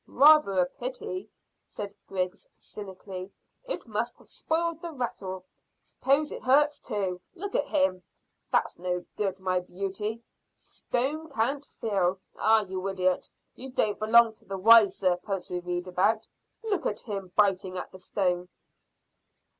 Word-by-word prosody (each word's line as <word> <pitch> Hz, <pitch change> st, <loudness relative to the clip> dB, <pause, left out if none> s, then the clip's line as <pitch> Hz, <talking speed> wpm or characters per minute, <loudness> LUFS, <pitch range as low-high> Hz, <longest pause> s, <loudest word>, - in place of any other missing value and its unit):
"Rather 300 Hz, -6 st, +6 dB
a 180 Hz, -, +5 dB
pity," 440 Hz, -, -5 dB, 0.4 s
said 205 Hz, -1 st, -6 dB
Griggs 185 Hz, +1 st, -3 dB
cynically. 190 Hz, -1 st, -8 dB, 0.3 s
"It -, -, -4 dB
must 230 Hz, +1 st, -2 dB
have -, -, -16 dB
spoiled 335 Hz, 0 st, -1 dB
the 340 Hz, -, -5 dB
rattle. 190 Hz, -, -4 dB, 0.3 s
S'pose 285 Hz, +3 st, +1 dB
it -, -, -6 dB
hurts 290 Hz, +3 st, +4 dB
too. 185 Hz, -3 st, -2 dB
Look 400 Hz, +3 st, -5 dB
at -, -, +1 dB
him! 280 Hz, -11 st, +1 dB, 0.5 s
That's -, -, +1 dB
no 180 Hz, 0 st, -2 dB
good, 195 Hz, -2 st, -1 dB
my 185 Hz, -1 st, +1 dB
beauty. 200 Hz, +5 st, -4 dB, 0.3 s
Stone 295 Hz, +6 st, -3 dB
can't 270 Hz, +2 st, 0 dB, 0.2 s
feel. 190 Hz, -4 st, +1 dB, 0.2 s
Ah, 220 Hz, 0 st, +4 dB
you 190 Hz, 0 st, -4 dB
idiot, 185 Hz, -1 st, 0 dB, 0.2 s
you 265 Hz, -, -8 dB
don't 215 Hz, -5 st, +1 dB
belong 225 Hz, +1 st, +6 dB
to -, -, -23 dB
the 195 Hz, -, -4 dB
wise 220 Hz, +1 st, +7 dB
serpents 185 Hz, +1 st, -1 dB
we 180 Hz, -, -1 dB
read 175 Hz, 0 st, -3 dB
about. 205 Hz, +5 st, +1 dB, 0.4 s
Look 400 Hz, -7 st, 0 dB
at 205 Hz, -, -3 dB
him 195 Hz, -5 st, -5 dB
biting 190 Hz, -2 st, +2 dB
at -, -, -5 dB
the 185 Hz, -, -11 dB
stone." 180 Hz, -2 st, -1 dB
205 Hz, 145 wpm, -28 LUFS, 185-255 Hz, 0.5 s, wise